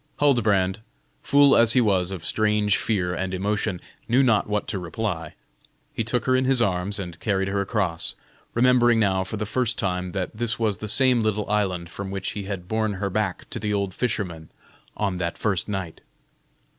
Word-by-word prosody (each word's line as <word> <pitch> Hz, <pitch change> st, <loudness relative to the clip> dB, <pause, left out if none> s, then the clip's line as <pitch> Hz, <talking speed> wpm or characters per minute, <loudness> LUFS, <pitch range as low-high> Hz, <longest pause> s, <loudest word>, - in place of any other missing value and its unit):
Huldbrand, 105 Hz, -10 st, +2 dB, 0.4 s
full 140 Hz, -1 st, +5 dB
as 115 Hz, -1 st, +6 dB
he 130 Hz, -, +4 dB
was 95 Hz, -6 st, +2 dB
of 95 Hz, -4 st, -6 dB
strange 105 Hz, -2 st, +2 dB
fear 90 Hz, -5 st, -1 dB
and 95 Hz, +1 st, -2 dB
emotion, 105 Hz, 0 st, -1 dB, 0.3 s
knew 125 Hz, +4 st, +4 dB
not 110 Hz, -5 st, +2 dB
what 105 Hz, 0 st, -1 dB
to 95 Hz, -, -1 dB
reply. 90 Hz, -1 st, -4 dB, 0.6 s
He -, -, -1 dB
took 120 Hz, +1 st, -1 dB
her 130 Hz, -, +3 dB
in 130 Hz, 0 st, +2 dB
his 130 Hz, -1 st, +4 dB
arms 100 Hz, -2 st, 0 dB
and 90 Hz, -5 st, -7 dB
carried 95 Hz, -3 st, 0 dB
her 100 Hz, 0 st, 0 dB
across, 95 Hz, -4 st, -1 dB, 0.4 s
remembering 120 Hz, -1 st, +4 dB
now 95 Hz, -3 st, +2 dB
for 95 Hz, +3 st, -5 dB
the 105 Hz, -, -2 dB
first 120 Hz, +2 st, -1 dB
time 90 Hz, -2 st, -2 dB
that 95 Hz, +1 st, -3 dB
this 115 Hz, 0 st, -1 dB
was 110 Hz, -4 st, 0 dB
the 110 Hz, -, -5 dB
same 125 Hz, +2 st, +3 dB
little 105 Hz, -1 st, -1 dB
island 95 Hz, -5 st, -1 dB
from 100 Hz, -1 st, -6 dB
which 95 Hz, -1 st, -3 dB
he 100 Hz, -1 st, -5 dB
had 95 Hz, -3 st, -5 dB
borne 110 Hz, 0 st, 0 dB
her 100 Hz, 0 st, -3 dB
back 100 Hz, -2 st, -2 dB
to -, -, -3 dB
the 105 Hz, 0 st, -1 dB
old 100 Hz, -2 st, -1 dB
fisherman 90 Hz, -10 st, -3 dB, 0.5 s
on 100 Hz, -4 st, -1 dB
that 85 Hz, -1 st, -2 dB
first 105 Hz, -2 st, -1 dB
night. 95 Hz, -5 st, -4 dB
105 Hz, 190 wpm, -24 LUFS, 95-110 Hz, 0.6 s, as